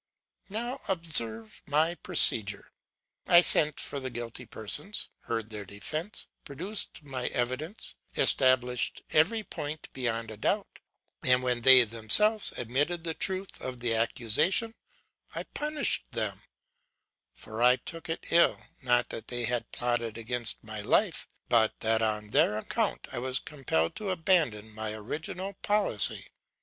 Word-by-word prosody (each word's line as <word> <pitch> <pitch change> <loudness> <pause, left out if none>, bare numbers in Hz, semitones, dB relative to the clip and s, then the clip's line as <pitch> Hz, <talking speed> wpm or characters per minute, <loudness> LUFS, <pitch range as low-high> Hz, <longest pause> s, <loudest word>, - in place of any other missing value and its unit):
'Now 240 +6 -5
observe 115 - -2
my 155 +4 +1
procedure. 110 - +3 0.6
I 175 0 +7
sent 150 -4 +6
for 140 - -3
the 130 -1 -3
guilty 120 0 -7
persons, 145 - -1 0.2
heard 115 -1 -4
their 105 -1 -5
defence, 155 - -5 0.2
produced 175 +4 -5
my 130 -3 -5
evidence, 130 - -3 0.2
established 125 -2 +2
every 200 +9 +2
point 150 -4 -7
beyond 115 -3 -3
a 110 - -9
doubt; - - -2 0.4
and 125 0 +3
when 125 -1 -1
they 130 +1 +9
themselves 115 - +5
admitted 145 +8 -1
the 165 -1 -2
truth 190 +3 -3
of 130 -1 -6
the 120 -1 0
accusation, 120 - +1 0.6
I - - -4
punished 300 -1 -2
them; - - -3 0.9
for 110 +1 -8
I 125 +1 +5
took 165 +5 -10
it 165 - -5
ill, 170 0 +3 0.2
not 120 -2 +1
that - - -6
they 120 -1 0
had 120 0 -2
plotted 120 -2 -2
against 120 0 -4
my 110 -1 -6
life, 105 - 0 0.2
but 115 -3 +2
that 110 0 +2
on 105 -1 -2
their 105 - +2
account 110 - -3
I - - -5
was 130 +1 -3
compelled 125 - -2
to 210 -2 -4
abandon 160 - 0
my 110 0 -5
original 160 - -6
policy. 205 - +2
125 Hz, 135 wpm, -28 LUFS, 115-165 Hz, 0.9 s, they